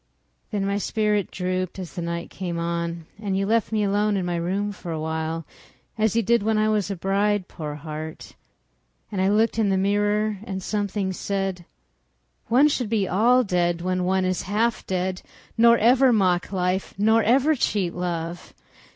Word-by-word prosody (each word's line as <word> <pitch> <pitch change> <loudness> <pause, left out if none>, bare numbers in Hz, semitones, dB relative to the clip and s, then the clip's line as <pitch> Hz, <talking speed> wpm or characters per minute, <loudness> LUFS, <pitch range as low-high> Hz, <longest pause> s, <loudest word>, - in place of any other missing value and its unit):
Then 205 -2 -1
my 200 +1 0
spirit 210 -2 0
drooped 185 0 -3
as 185 -3 -7
the 180 - -4
night 170 0 -4
came 175 -3 -4
on, 170 0 -3 0.2
And 195 -3 -1
you 195 - 0
left 225 +1 +1
me 215 -1 +1
alone 205 +1 +1
in 185 - -1
my 175 -1 -1
room 190 +5 -1
for 180 -3 -8
a 160 - -3
while, 160 +1 -3 0.5
As 220 0 +1
you 230 - +3
did 235 +3 +3
when 220 +1 +1
I 215 0 +2
was 210 -2 0
a 200 - -2
bride, 195 +2 0
poor 150 -3 -6
heart. 155 +1 -7 0.8
And 195 -3 -1
I 190 - +3
looked 220 +2 +2
in 210 -3 +2
the 190 - +2
mirror 205 +1 +1
and 190 -3 -5
something 200 -2 -2
said: 195 -2 -3 0.8
"One 255 +6 +5
should 255 -7 -1
be 210 -4 +1
all 240 +7 +4
dead 175 -4 0
when 185 0 -1
one 190 +1 +1
is 185 0 0
half 225 +3 +1
dead—" 185 0 -2 0.3
Nor 235 +1 +6
ever 250 +4 +5
mock 185 -5 +2
life, 185 0 -1
nor 220 +3 +4
ever 265 +8 +3
cheat 200 - 0
love." 175 -1 -4
195 Hz, 180 wpm, -24 LUFS, 180-215 Hz, 0.8 s, Nor